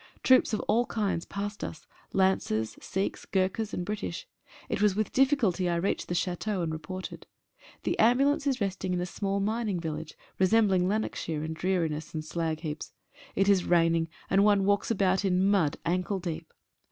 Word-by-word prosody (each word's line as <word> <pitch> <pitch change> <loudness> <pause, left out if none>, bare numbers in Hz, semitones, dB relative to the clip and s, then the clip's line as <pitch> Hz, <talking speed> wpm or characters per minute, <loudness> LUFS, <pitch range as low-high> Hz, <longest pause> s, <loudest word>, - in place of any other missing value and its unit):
Troops 260 -3 +5
of 215 - 0
all 240 +2 +1
kinds 200 -6 -1
passed 205 +1 -4
us 155 - -6 0.2
— - - -33
Lancers, 110 - +1
Sikhs, 190 +1 -2
Gurkhas, 195 +3 0
and 175 - -3
British. 210 - -4 0.4
It - - -2
was 210 -2 +4
with 215 0 -1
difficulty 250 - +2
I 170 - +1
reached 170 +4 -1
the 175 - -2
Chateau, 180 +2 -1
and 160 -1 -2
reported. 180 +4 -7 0.6
The - - -1
ambulance 275 +5 +4
is 265 -2 +1
resting 190 -2 -1
in - - -1
a 180 - -1
small 195 +2 -2
mining 210 -2 -1
village, 160 -1 -5 0.2
resemb 210 +3 +4
ling 180 -1 +3
Lanarkshire 185 -6 -2
in 160 0 -3
dreariness 165 -3 -1
and 155 - -2
slagheaps. 160 -1 -3 0.4
It 195 - +2
is 195 -3 +4
rain 165 -1 +4
ing, 165 -1 0 0.2
and 195 +1 +4
one 205 -2 +4
walks 200 0 +2
about 190 -3 +2
in 190 0 +2
mud 165 -8 +2
ankle 180 +3 0
deep. 165 -3 -5
190 Hz, 175 wpm, -29 LUFS, 170-205 Hz, 0.6 s, Troops